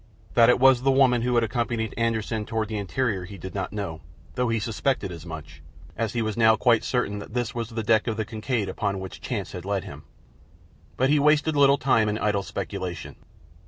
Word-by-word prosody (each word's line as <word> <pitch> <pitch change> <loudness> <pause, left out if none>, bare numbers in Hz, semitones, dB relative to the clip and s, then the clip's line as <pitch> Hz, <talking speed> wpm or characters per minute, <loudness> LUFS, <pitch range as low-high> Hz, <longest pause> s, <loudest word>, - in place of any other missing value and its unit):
That 115 -1 +6
it 125 - +5
was 130 -1 +6
the 135 - +2
woman 130 -3 +4
who 125 +1 0
had 120 - +4
accompanied 115 0 -2
Anderssen 110 -2 -1
toward 110 -1 -2
the 110 - -3
interior 100 -1 -1
he 100 +2 -10
did 95 +1 -8
not 95 -2 -3
know, 95 -6 -5 0.3
though 125 -1 0
he 115 - +1
suspected 115 -1 -1
as 85 0 -9
much, 75 -3 -9 0.3
as 110 -2 -2
he 120 - 0
was 110 -2 -2
now 110 -1 +5
quite 115 -1 +3
certain 115 -5 -1
that 105 - -10
this 120 -3 -1
was 115 -2 -4
the 115 -1 -4
deck 110 +1 +2
of 110 -1 -1
the 110 - -1
Kincaid 110 0 -2
upon 100 0 -2
which 95 -1 -8
chance - - -4
had 90 - -7
led 100 0 -2
him. - - -9 1.0
But 130 +2 +2
he 150 - +4
wasted 150 +1 +3
little 140 -1 +5
time 115 -5 +2
in 105 - -1
idle 105 -2 0
speculation. 90 -3 -5
110 Hz, 215 wpm, -25 LUFS, 100-125 Hz, 1.0 s, That